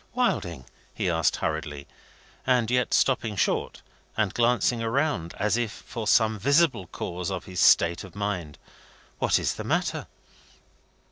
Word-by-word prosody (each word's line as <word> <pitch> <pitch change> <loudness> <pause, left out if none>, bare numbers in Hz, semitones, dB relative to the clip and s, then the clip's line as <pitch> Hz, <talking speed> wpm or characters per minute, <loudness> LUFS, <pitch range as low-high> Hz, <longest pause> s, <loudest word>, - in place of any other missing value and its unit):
"Wilding," 85 - -1 0.3
he 90 - 0
asked 80 -1 +2
hurriedly, 75 -3 -3 0.6
and 125 -3 +2
yet 125 0 +1
stopping 115 -5 +2
short - - -1 0.3
and 105 -3 +1
glancing 120 0 +2
around 115 - -1
as 105 +2 +1
if 120 -3 -1
for 110 0 -7
some 110 -1 +3
visible 140 - +2
cause 90 +1 -5
of 95 -2 -4
his 90 -2 -6
state 85 0 +5
of 95 -1 -12
mind: 95 -8 -3 0.6
"what - - +3
is - - 0
the - - -6
matter?" - - -1
105 Hz, 140 wpm, -26 LUFS, 85-120 Hz, 0.6 s, state